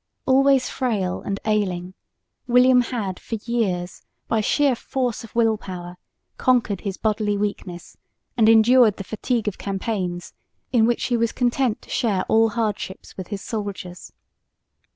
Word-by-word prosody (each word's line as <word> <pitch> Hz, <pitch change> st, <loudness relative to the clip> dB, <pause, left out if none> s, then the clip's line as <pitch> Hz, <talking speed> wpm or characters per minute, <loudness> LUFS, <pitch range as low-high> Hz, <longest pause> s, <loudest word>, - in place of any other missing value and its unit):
Always 270 Hz, -1 st, +4 dB
frail 210 Hz, -8 st, -2 dB
and 195 Hz, 0 st, -3 dB
ailing, 185 Hz, -4 st, -1 dB, 0.5 s
William 250 Hz, +1 st, +5 dB
had 220 Hz, -7 st, -4 dB
for 230 Hz, -, -5 dB
years 190 Hz, -7 st, -2 dB, 0.3 s
by 220 Hz, -, +1 dB
sheer 280 Hz, +4 st, +2 dB
force 245 Hz, -1 st, -3 dB
of 230 Hz, -, -13 dB
will 225 Hz, -2 st, +3 dB
power 180 Hz, -1 st, -8 dB, 0.4 s
conquered 235 Hz, -6 st, +1 dB
his 195 Hz, -3 st, -4 dB
bodily 210 Hz, -1 st, 0 dB
weakness 200 Hz, -4 st, -5 dB, 0.4 s
and 225 Hz, -2 st, +4 dB
endured 225 Hz, 0 st, +6 dB
the 195 Hz, -, -5 dB
fatigue 220 Hz, +3 st, -2 dB
of 205 Hz, -, -3 dB
campaigns 190 Hz, -3 st, -3 dB, 0.4 s
in 230 Hz, -3 st, +4 dB
which 240 Hz, -, 0 dB
he 240 Hz, -, +1 dB
was 230 Hz, 0 st, +1 dB
content 245 Hz, -2 st, 0 dB
to -, -, -14 dB
share 215 Hz, -7 st, +1 dB
all 225 Hz, 0 st, +4 dB
hardships 210 Hz, -4 st, -4 dB
with 185 Hz, -2 st, -7 dB
his 205 Hz, -2 st, -6 dB
soldiers. 200 Hz, -5 st, -6 dB
220 Hz, 145 wpm, -23 LUFS, 195-240 Hz, 0.5 s, endured